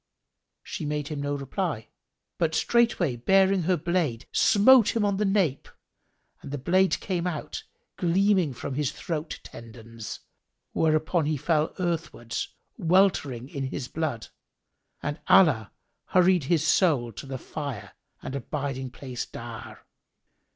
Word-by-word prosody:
She - - -6
made 150 -1 -2
him 150 -2 -4
no 145 0 -1
reply, 140 - -3 0.5
but 160 -2 +1
straightway 225 - +2
baring 195 +8 +4
her 180 - +4
blade, 165 -8 -1
smote 225 +2 +5
him 220 -2 +2
on 200 -1 +1
the 210 - +1
nape 195 -9 +1 0.7
and - - -9
the 145 - -3
blade 185 +7 +2
came 180 -2 -2
out 160 -4 -4 0.3
gleaming 185 -2 +2
from 135 - -5
his 145 -1 0
throat 160 -2 -4
tendons, 115 -1 -9 0.5
whereupon 155 0 +2
he 155 -1 0
fell 155 +2 0
earthwards, 165 -10 -3 0.3
weltering 165 - +2
in 140 -1 -4
his 130 -1 -4
blood, 145 -6 -3 0.7
and 150 +2 -3
Allah 110 - +5 0.3
hurried 180 -4 +3
his 160 +1 +2
soul 145 -10 +3
to 115 - -9
the 135 -1 -4
Fire 140 -3 -6 0.3
and 135 - -5
abiding 135 -1 -3
place 125 -1 -6
dire. - - -9
155 Hz, 130 wpm, -26 LUFS, 135-185 Hz, 0.7 s, smote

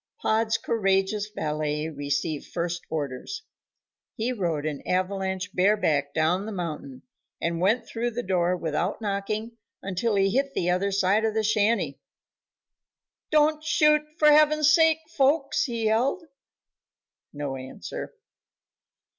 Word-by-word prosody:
Pod's 220 +1 +1
courageous 200 -1 0
valet 150 -4 -2
received 145 0 -3
first 175 0 -3
orders. 155 - -4 0.7
He 245 +1 -1
rode 170 -9 -2
an 150 -3 -3
avalanche 190 +1 -1
bareback 180 -8 +2
down 175 +6 +1
the - - -4
mountain 155 -8 -6 0.4
and 170 0 -1
went 210 +7 +2
through 240 +1 -2
the 240 +1 -4
door 180 -1 +1
without 170 +3 -2
knocking 215 +2 -3 0.3
until 195 +3 -1
he 195 0 +3
hit 275 +4 0
the 180 0 +1
other 195 +3 0
side 195 +2 +2
of 220 -1 0
the 220 - +1
shanty. 215 +2 +1 1.3
"Don't 305 0 +3
shoot, 300 0 +4 0.2
for 300 -2 +6
heaven's 305 0 +5
sake, 320 0 +4
folks;" 285 0 +2
he 230 -4 -3
yelled. 245 +11 +1 1.1
No 145 -2 -4
answer. 130 0 -7
200 Hz, 125 wpm, -26 LUFS, 170-235 Hz, 1.3 s, for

